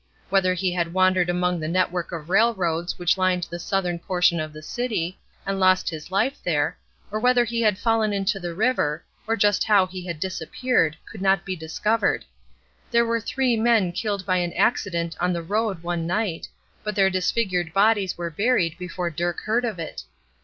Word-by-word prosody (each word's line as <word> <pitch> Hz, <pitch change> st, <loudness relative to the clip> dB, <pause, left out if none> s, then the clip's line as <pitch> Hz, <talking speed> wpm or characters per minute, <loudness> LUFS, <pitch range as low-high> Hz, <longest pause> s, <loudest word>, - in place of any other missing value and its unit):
Whether 185 Hz, -2 st, +3 dB
he 185 Hz, +1 st, 0 dB
had 170 Hz, -1 st, -2 dB
wandered 185 Hz, -1 st, +3 dB
among 180 Hz, 0 st, 0 dB
the 155 Hz, -, -3 dB
network 180 Hz, 0 st, 0 dB
of 165 Hz, -3 st, -6 dB
railroads 185 Hz, -6 st, +1 dB
which 175 Hz, +2 st, +1 dB
lined 185 Hz, -1 st, +2 dB
the 170 Hz, +1 st, -6 dB
southern 180 Hz, -1 st, -1 dB
portion 180 Hz, -1 st, +2 dB
of 155 Hz, 0 st, -4 dB
the 155 Hz, 0 st, -11 dB
city, 190 Hz, -4 st, -3 dB, 0.3 s
and 195 Hz, 0 st, -2 dB
lost 185 Hz, -2 st, +3 dB
his 155 Hz, 0 st, -8 dB
life 220 Hz, +9 st, 0 dB
there, 155 Hz, -3 st, 0 dB, 0.4 s
or 215 Hz, -, -1 dB
whether 250 Hz, +1 st, +4 dB
he 235 Hz, 0 st, -2 dB
had 210 Hz, -4 st, +3 dB
fallen 225 Hz, -1 st, +1 dB
into 200 Hz, +1 st, 0 dB
the 175 Hz, -2 st, -5 dB
river, 180 Hz, -8 st, +1 dB, 0.2 s
or 225 Hz, -, +2 dB
just 205 Hz, -1 st, +3 dB
how 205 Hz, -3 st, +4 dB
he 185 Hz, 0 st, -8 dB
had 170 Hz, -3 st, -4 dB
disappeared, 185 Hz, 0 st, 0 dB
could 210 Hz, -, -10 dB
not 195 Hz, -1 st, +2 dB
be 190 Hz, -, -3 dB
discovered. 185 Hz, +7 st, 0 dB, 0.6 s
There 235 Hz, -1 st, +3 dB
were 230 Hz, 0 st, 0 dB
three 250 Hz, +2 st, +1 dB
men 220 Hz, -5 st, +3 dB
killed 200 Hz, +1 st, -3 dB
by 185 Hz, -1 st, +2 dB
an 175 Hz, -1 st, -1 dB
accident 170 Hz, -7 st, 0 dB
on 180 Hz, +1 st, +1 dB
the 170 Hz, -1 st, -3 dB
road 205 Hz, -1 st, -1 dB
one 170 Hz, -1 st, -2 dB
night, 185 Hz, -2 st, -1 dB, 0.4 s
but 210 Hz, -1 st, -3 dB
their 195 Hz, -1 st, +4 dB
disfigured 185 Hz, -2 st, 0 dB
bodies 200 Hz, 0 st, +2 dB
were 170 Hz, -1 st, -4 dB
buried 180 Hz, -3 st, +1 dB
before 180 Hz, -1 st, -3 dB
Dirk 175 Hz, +2 st, -2 dB
heard 235 Hz, +3 st, 0 dB
of 220 Hz, -5 st, -3 dB
it. 165 Hz, -2 st, -6 dB
185 Hz, 190 wpm, -24 LUFS, 170-215 Hz, 0.6 s, whether